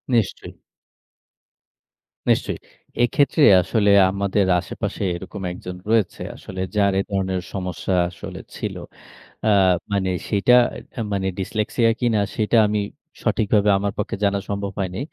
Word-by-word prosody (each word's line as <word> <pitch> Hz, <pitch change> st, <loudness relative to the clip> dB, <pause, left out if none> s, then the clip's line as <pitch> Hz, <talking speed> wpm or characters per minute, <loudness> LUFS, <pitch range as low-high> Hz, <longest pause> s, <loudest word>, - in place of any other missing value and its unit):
নিশ্চয়ই। 110 Hz, -4 st, -1 dB, 1.8 s
নিশ্চয়ই। -, -, +1 dB, 0.4 s
এক্ষেত্রে 140 Hz, +5 st, +2 dB, 0.2 s
আসলে 105 Hz, +4 st, +1 dB, 0.2 s
আমাদের 100 Hz, 0 st, +1 dB
আশেপাশে 100 Hz, +3 st, -4 dB
এরকম 95 Hz, +3 st, -8 dB
একজন 90 Hz, 0 st, -7 dB
রয়েছে। 110 Hz, -5 st, +1 dB
আসলে 95 Hz, -1 st, -7 dB
যার 100 Hz, -1 st, +3 dB
এ -, -, +3 dB
ধরনের 95 Hz, -2 st, -1 dB
সমস্যা 95 Hz, -1 st, -3 dB, 0.2 s
আসলে 85 Hz, -, -9 dB, 0.2 s
ছিল। -, -, -4 dB, 0.7 s
অ্যা -, -, +2 dB, 0.4 s
মানে 95 Hz, -2 st, +1 dB, 0.2 s
সেটা 105 Hz, +4 st, +3 dB, 0.4 s
এ -, -, -1 dB
মানে 95 Hz, -1 st, -1 dB
ডিসলেক্সিয়া 110 Hz, +4 st, 0 dB
কিনা 115 Hz, -4 st, +2 dB, 0.2 s
সেটা 110 Hz, +2 st, +1 dB
আমি 105 Hz, 0 st, 0 dB, 0.4 s
সঠিকভাবে 105 Hz, -1 st, +2 dB
আমার 100 Hz, 0 st, -2 dB
পক্ষে 105 Hz, -, -2 dB
জানা 100 Hz, 0 st, +2 dB
সম্ভব 100 Hz, -1 st, -3 dB
হয়নি। 95 Hz, -2 st, -3 dB
100 Hz, 125 wpm, -22 LUFS, 95-105 Hz, 1.8 s, যার